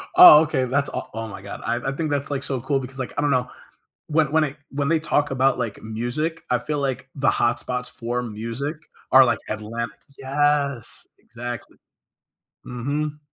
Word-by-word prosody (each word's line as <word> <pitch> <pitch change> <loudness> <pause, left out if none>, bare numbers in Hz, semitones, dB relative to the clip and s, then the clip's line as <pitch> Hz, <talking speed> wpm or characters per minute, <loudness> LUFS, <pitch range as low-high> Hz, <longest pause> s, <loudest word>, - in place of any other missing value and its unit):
Oh, 360 - +11
okay, 145 -5 0
that's 140 +3 0
oh, - - -4
oh 115 0 -4
my 100 - -9
god. 100 - -8
I 115 +1 +1
I - - -1
think 155 +1 -2
that's, 140 0 -1
like, 140 -1 -2
so 135 -3 -2
cool 135 +1 0
because, 130 +1 -8
like, 130 - -4
I - - +2
don't 145 -1 +2
know, 125 -1 +1 0.6
when 155 -1 +2
when 160 -1 +4
it 145 0 -4
when 140 +1 -1
they 165 0 +3
talk 145 -3 +1
about, 135 0 +2
like, 115 -4 -4
music, 120 +9 -3
I 125 - +3
feel 150 +4 -3
like 130 -1 -2
the 140 -1 +2
hot 120 - +1
spots 125 0 -3
for 120 +1 -3
music 115 +7 -4 0.4
are 130 0 +9
like 120 - +1
Atlantic 110 +1 -4 0.2
Yes, 140 -2 0
exactly. 120 -1 -8 0.9
Mhm. 145 +5 -3
135 Hz, 190 wpm, -23 LUFS, 120-145 Hz, 0.9 s, Oh